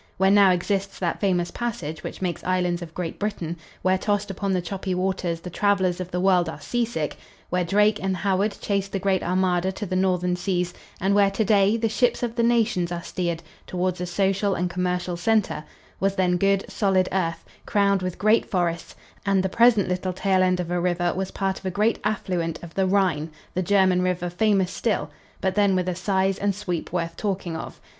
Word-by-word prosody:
Where 190 +1 +4
now 200 -1 +7
exists 195 +2 0
that 175 -3 -2
famous 180 -3 +1
passage 175 -10 -4
which - - -6
makes 175 -2 -2
islands 180 -1 0
of 165 -1 -9
Great 175 -2 -4
Britain, 190 -6 -3 0.3
where, 185 +1 +3
tossed 205 0 0
upon 195 +1 -2
the 185 - +2
choppy 185 +1 -3
waves, 180 -2 -1
the 180 - -7
travelers 190 -2 +1
of 180 -1 -4
the 180 - -2
world 180 -3 +3
are 155 - -7
seasick, 225 -3 -2 0.3
where 180 0 +1
Drake 210 +4 +3
and 190 -1 -1
Howard 200 +2 0
chased 200 -1 -1
the - - +1
Great 190 0 +1
Armada 185 0 +1
to 205 - -5
the 185 - -3
Northern 180 -1 +1
seas 180 -1 -1 0.3
and 195 +2 +1
where, 200 -1 +5
to 205 +2 -1
day, 200 +1 +4
the 225 0 +1
ships 245 +3 +1
of 235 -2 -1
the 235 - +1
nations 230 -7 +2
are 170 -1 -4
steered 170 -2 -3 0.2
toward 180 0 -1
a 180 - -2
social 195 +2 +1
and 180 0 -1
commercial 180 0 -1
center, 210 -3 +1 0.4
was 195 0 +1
then 180 -2 +2
good, 195 +1 +2
solid 190 -3 +1
earth 170 -3 -1 0.2
crowned 200 -2 +2
with 185 -1 -3
great 215 +2 +3
forests, 170 -3 -1 0.3
and 195 -2 +2
the 190 - 0
present 230 -1 +4
little 180 0 -2
tail 190 0 +2
end 185 -1 +2
of 175 -1 -3
a 175 - +1
river 175 -1 +1
was 190 0 -3
part 195 -1 -2
of - - -16
a - - +1
great 210 +5 +1
affluent 180 -6 -1
of 170 - -9
the 190 -1 +1
Rhine, 185 -6 +1 0.2
the 185 - 0
German 185 -1 +3
river 180 -1 -1
famous 195 -1 +2
still, 225 -4 -1 0.3
but 190 -1 +1
then 200 -1 +3
with 180 -1 0
a 180 - 0
size 190 +1 0
and 200 -1 0
sweep 180 -5 -4
worth 170 -1 -2
talking 190 -5 -3
of. 160 - -7
185 Hz, 205 wpm, -24 LUFS, 180-200 Hz, 0.4 s, now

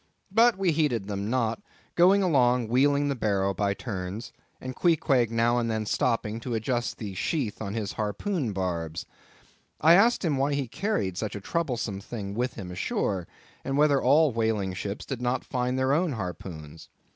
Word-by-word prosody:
But 230 +1 +5
we 190 -3 +2
heeded 145 -10 0
them 100 0 -3
not, 115 - 0 0.3
going 190 +3 +5
along 125 -8 +3
wheeling 140 +4 +3
the 140 - 0
barrow 100 -4 0
by 100 +1 0
turns, 100 -1 -5 0.3
and 130 0 -6
Queequeg 140 -8 +2
now 115 +1 +2
and 115 -1 -1
then 110 -1 -1
stopping 115 0 0
to 120 0 -3
adjust 120 +2 -1
the 105 -4 -6
sheath 115 - -2
on 100 -1 -4
his 105 -3 -2
harpoon 110 - -2
barbs. 85 -4 -3 0.7
I 160 +2 +6
asked 215 +3 +4
him 150 -4 +1
why 140 +2 +1
he 140 -2 -2
carried 105 - -2
such 105 -3 -3
a - - -4
troublesome 120 -6 -2
thing 100 -2 -6
with 125 +4 -2
him 90 -2 -7
ashore, 90 0 -2 0.4
and 135 +1 -2
whether 145 -2 +4
all 145 +3 +4
whaling 110 -4 0
ships 100 +2 -5
did 130 -3 -5
not 125 +1 -1
find 125 0 -1
their 130 +1 +2
own 165 0 +1
harpoons. 85 -6 -7
120 Hz, 175 wpm, -27 LUFS, 100-140 Hz, 0.7 s, I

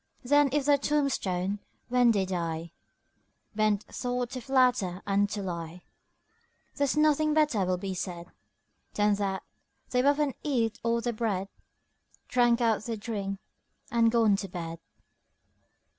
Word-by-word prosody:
Then 290 +2 +4
if 290 0 0
their 285 -1 +4
toombstone 205 -10 0 0.3
when 250 -1 +4
they 200 -4 +2
die 170 -3 -3 0.8
Ben't 215 -1 +1
taught 245 -1 -3
to 255 -2 -5
flatter 245 -8 +2
and 200 0 +2
to 205 -1 -4
lie, 170 -1 -6 0.9
There's 285 0 0
nothing 305 0 +3
better 295 -11 +2
will 180 0 0
be 190 +1 -4
said 175 -1 -6 0.6
Than 210 0 +3
that 195 -2 -2 0.5
"They've 250 0 +2
up 285 +1 +4
and 295 -3 +1
eat 235 -5 0
all 235 0 +1
their 240 0 -1
bread, 205 -4 -2 0.8
Drank 240 -1 +3
up 225 -2 +2
their 225 +1 -4
dring 200 -3 -4 0.5
and 230 -1 +4
gone 225 -3 +4
to 195 - -4
bed. 165 -2 -6
225 Hz, 140 wpm, -28 LUFS, 195-255 Hz, 0.9 s, Then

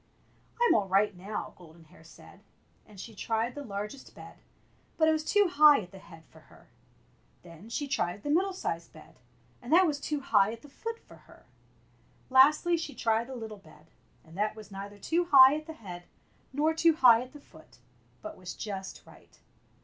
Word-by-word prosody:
"I'm 480 0 +4
all 205 -3 +1
right 195 +1 +2
now," 195 +4 -6
Golden 170 -1 -17
Hair 160 +1 -20
said; 165 - -17 0.5
and 210 -3 -15
she 225 +4 -9
tried 225 +3 -2
the 290 - -8
largest 210 +3 -7
bed, - - -13 0.6
but 315 - +3
it - - +5
was 310 -1 -1
too 410 +5 +2
high 300 -4 +6
at 180 -3 -12
the 195 - -12
head 165 -3 -16
for 160 - -19
her. 155 - -21 0.7
Then 175 +5 -14
she 285 +5 -3
tried 200 -7 -2
the 290 - -2
middle 375 +5 +2
sized 170 - -5
bed, 155 - -17 0.4
and 245 - -9
that 365 +3 +6
was 295 -4 -1
too 295 0 -3
high 210 -5 +2
at 230 - -12
the 290 - -14
foot 455 +10 -7
for - - -18
her. - - -21 0.9
Lastly 300 +6 +5
she 300 -5 -6
tried 225 0 0
the 265 - -8
little 220 -3 -8
bed, 155 -4 -20 0.3
and 160 +1 -17
that 210 +2 -1
was 215 -2 -13
neither 200 +1 -9
too 335 - -1
high 270 -4 +8
at 310 +1 -5
the 320 - -7
head 180 - -10 0.5
nor 300 +4 +1
too 325 0 +3
high 240 -5 +6
at 255 +1 -10
the 295 - -12
foot, - - -19 0.5
but 320 0 -8
was 180 -1 -9
just 195 -3 -7
right. - - -19
230 Hz, 195 wpm, -29 LUFS, 195-300 Hz, 0.9 s, high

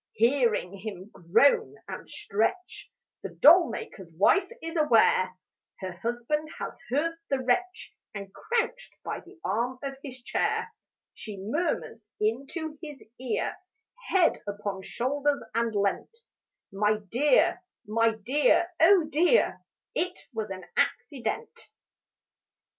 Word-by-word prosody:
Hearing 230 -6 +2
him 200 -1 -7
groan 275 - +3
and - - -8
stretch 225 - -2 0.3
The - - -5
doll 340 0 +7
maker's 190 -5 -7
wife 365 - +3
is 330 +1 -6
aware 225 - +4 0.4
Her 185 -1 -4
husband 240 - -2
has - - -5
heard 330 +6 0
the 275 - +2
wretch, 365 +12 -1 0.2
And 200 -2 -8
crouched 485 +1 -2
by - - -4
the 370 0 -17
arm 235 +6 -1
of 275 -1 -4
his 255 -3 -9
chair, 455 - -1 0.4
She 210 -2 -8
murmurs 225 - -2
into 275 +8 -2
his 295 -4 -9 0.2
ear, 255 -1 -2 0.5
Head 375 -3 +3
upon 205 -1 -4
shoulder 280 +7 -1
leant: 225 - -1 0.5
'My 210 +2 +2
dear, 295 - +3 0.2
my 225 +1 +2
dear, 285 - +2
oh 350 +2 +7
dear, 345 +10 +3 0.3
It 360 +1 -1 0.2
was 220 -2 -3
an 185 -1 -7
accident.' 280 - -2
255 Hz, 115 wpm, -28 LUFS, 210-315 Hz, 0.5 s, doll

